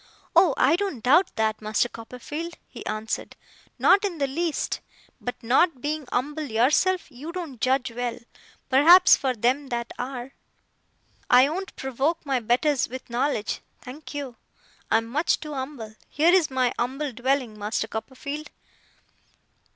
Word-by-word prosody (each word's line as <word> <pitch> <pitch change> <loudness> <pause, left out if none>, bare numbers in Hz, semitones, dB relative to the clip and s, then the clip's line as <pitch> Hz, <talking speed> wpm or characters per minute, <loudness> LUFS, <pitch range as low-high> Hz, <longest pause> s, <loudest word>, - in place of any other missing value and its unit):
'Oh, 340 -4 +5
I 310 +6 +4
don't 375 - -3
doubt 305 +9 +5
that, 220 -1 0
Master 215 +2 +1
Copperfield,' 250 +9 -7
he - - -10
answered; 215 +1 -3 0.4
'not 395 - +5
in 380 -5 -2
the 285 - +1
least. 315 +4 -2 0.4
But 245 - -4
not 265 +5 +3
being 295 +1 -3
umble 295 +5 -1
yourself, 300 +11 +2
you 285 +6 -8
don't 330 -9 -7
judge 260 -1 +1
well, 240 0 -3 0.5
perhaps, 340 +8 +7
for 260 -2 -1
them 255 +5 +1
that 235 -2 -4
are. 255 +1 -5 1.0
I 250 +2 +7
won't 380 +4 -5
provoke 270 +6 -1
my 270 -3 +1
betters 245 +5 +1
with 255 -1 -8
knowledge, 240 -2 -1 0.2
thank 290 +4 -10
you. 275 -5 -5 0.5
I'm 225 0 +2
much 285 +9 0
too 300 -1 -7
umble. 260 -5 -6 0.2
Here 325 +4 +3
is 365 -4 +4
my 255 -2 +1
umble 270 +4 -2
dwelling, 250 -2 -1
Master 215 +1 -2
Copperfield! 280 +7 -6
265 Hz, 145 wpm, -25 LUFS, 240-305 Hz, 1.0 s, perhaps